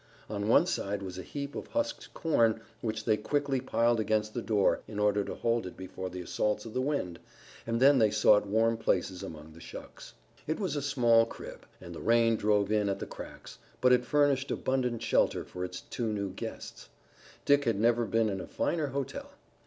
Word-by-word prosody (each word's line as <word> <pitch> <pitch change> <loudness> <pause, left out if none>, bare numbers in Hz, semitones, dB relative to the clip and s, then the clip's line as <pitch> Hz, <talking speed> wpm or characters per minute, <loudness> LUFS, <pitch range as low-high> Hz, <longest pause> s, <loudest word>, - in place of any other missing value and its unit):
On 100 0 -2
one 115 - +5
side 100 - -2
was 95 -1 -6
a - - -4
heap 140 +6 -6
of - - -6
husked 290 +1 -3
corn 115 -9 +2 0.2
which 110 -2 -3
they 110 -2 +3
quickly 140 +3 -1
piled 120 -2 +2
against 110 0 0
the 120 - -2
door 105 -3 +2
in 105 -1 -7
order 105 -1 +2
to - - -6
hold 115 -3 0
it 90 - -10
before 95 0 -6
the 90 0 -6
assaults 105 +4 -1
of 110 - -8
the 130 - 0
wind, 130 - -2 0.5
and 115 0 0
then 135 +1 +6
they 110 -2 +5
sought 105 -1 +4
warm 115 +2 +2
places 95 -4 0
among 80 0 -9
the 80 - -14
shucks. - - -11 0.3
It 155 - -1
was 185 -8 -1
a 145 - -1
small 120 -5 +4
crib, - - -10
and 85 -1 -9
the - - -8
rain 115 0 +4
drove 105 -1 +1
in 105 -2 +2
at 100 - -1
the - - -5
cracks, - - -10 0.2
but 125 0 +5
it 125 - +4
furnished 140 0 +2
abundant 125 -3 -1
shelter - - +2
for 90 - -6
its 90 0 -5
two 115 -3 -3
new 100 -2 -2
guests. 95 - -8 0.6
Dick 145 0 +4
had 115 -4 +1
never 120 +1 +3
been 115 0 +1
in 95 -3 -2
a - - -8
finer 160 -3 -1
hotel. 135 0 -4
115 Hz, 205 wpm, -30 LUFS, 100-130 Hz, 0.6 s, then